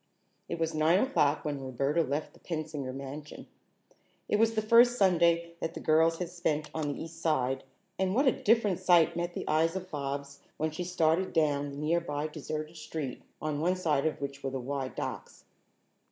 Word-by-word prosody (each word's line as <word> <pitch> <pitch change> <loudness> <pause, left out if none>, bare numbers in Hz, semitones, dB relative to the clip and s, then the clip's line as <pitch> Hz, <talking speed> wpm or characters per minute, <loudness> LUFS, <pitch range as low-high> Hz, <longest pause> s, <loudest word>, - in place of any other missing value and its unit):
It - - -2
was 165 0 -1
nine 155 +3 +4
o'clock 160 - +2
when 145 -2 -2
Roberta 135 +5 0
left 150 0 -2
the - - -19
Pensinger 155 -5 -4
mansion. 140 +3 -8 0.8
It - - +2
was 225 +1 +3
the 215 - +2
first 240 +2 +6
Sunday 170 -3 +3
that 165 0 -4
the - - -4
girls 160 +1 +3
had 180 -1 -3
spent 155 -4 -1
on 155 -2 -2
the 145 - -5
East 165 0 -10
Side, 135 -5 +1 0.4
and 190 +1 +1
what 275 +4 +3
a 260 - +6
different 210 -6 +2
sight 175 -3 +4
met 175 0 -3
the - - -4
eyes 165 +3 +2
of 185 -1 -5
Bobs 140 -1 -4 0.2
when 155 0 -1
she 175 +3 -4
started 175 +1 +1
down 145 -3 +2
the 140 - -8
nearly 150 -1 -1
deserted 155 +1 -5
street, 150 -4 -5 0.2
on 150 -1 -2
one 180 +4 +2
side 160 -5 +1
of 155 - -3
which 140 0 -5
were 135 - -1
the 135 0 -4
wide 135 +1 -4
docks. - - -6
160 Hz, 190 wpm, -30 LUFS, 145-175 Hz, 0.8 s, first